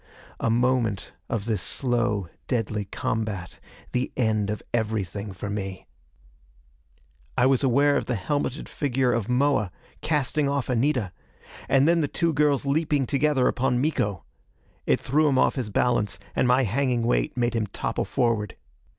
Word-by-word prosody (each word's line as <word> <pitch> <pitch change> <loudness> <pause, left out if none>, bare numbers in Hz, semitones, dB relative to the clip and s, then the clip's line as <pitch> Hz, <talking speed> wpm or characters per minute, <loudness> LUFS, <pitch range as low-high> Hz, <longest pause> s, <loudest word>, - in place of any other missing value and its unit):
A - - 0
moment 120 -3 +1 0.2
of 105 -3 -2
this 110 -5 -1
slow 120 -7 0 0.2
deadly 110 -4 -1
combat 105 -4 -3 0.3
the 125 +1 -1
end 110 -4 +1
of 105 - -3
everything 105 -3 -2
for 95 +2 -6
me. 95 -2 -4 1.5
I 125 - +4
was 135 0 +3
aware 140 +3 +4
of - - -3
the 125 - 0
helmeted 145 +7 -2
figure 130 -3 0
of 115 -1 -1
Moa 125 -6 +2 0.3
casting 150 -1 +1
off 140 -2 -1
Anita 125 -5 +1 0.6
and 135 +2 +4
then 170 0 +4
the 145 - +1
two 165 +3 0
girls 145 -2 +2
leaping 145 -1 +1
together 140 -1 +2
upon 125 0 +1
Miko. 115 - 0 0.6
It - - +3
threw 150 +4 +2
him 135 - +2
off - - +4
his 125 -6 -3
balance, 105 -1 +1 0.2
and - - +2
my 125 +2 +4
hanging 125 +1 0
weight 120 +2 0
made 120 0 +1
him 110 -2 0
topple - - -3
forward. 110 -5 0
125 Hz, 150 wpm, -25 LUFS, 105-140 Hz, 1.5 s, I